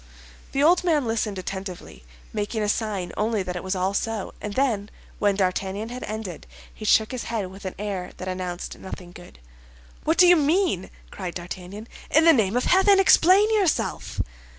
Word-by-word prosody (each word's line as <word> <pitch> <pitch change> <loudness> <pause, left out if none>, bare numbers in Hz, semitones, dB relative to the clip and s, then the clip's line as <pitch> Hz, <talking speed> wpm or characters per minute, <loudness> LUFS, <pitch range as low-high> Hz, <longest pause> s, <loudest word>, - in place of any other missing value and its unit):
The 275 - +2
old 345 +4 +5
man 310 -6 +2
listened 225 -3 -1
attentively, 185 - -7 0.3
making 210 +1 -2
a 205 - 0
sign 205 -5 -2
only 215 -1 0
that 180 -1 -5
it 180 - -5
was 190 +1 -2
all 185 +1 0
so; 220 0 -2
and 210 -1 -5
then, 220 -7 0 0.3
when 205 -1 +2
D'Artagnan 195 +3 -1
had 250 +1 -6
ended, 215 -6 -6 0.3
he 215 - -9
shook 215 +1 +4
his 255 -2 -4
head 210 -5 -3
with 195 +1 -12
an 185 - -4
air 195 -3 -4
that 185 - -7
announced 185 -1 -5
nothing 180 -2 -9
good. 175 - -14 0.7
"What 320 +2 +1
do 365 - +8
you 355 0 +8
mean?" 310 - +1 0.2
cried 180 -3 -6
D'Artagnan. 185 +4 -7 0.2
"In 315 +2 +4
the 330 - +8
name 220 -4 +2
of 250 - +1
heaven, 385 +1 +5
explain 385 +2 +6
yourself!" 395 -7 0
210 Hz, 180 wpm, -24 LUFS, 185-260 Hz, 0.7 s, do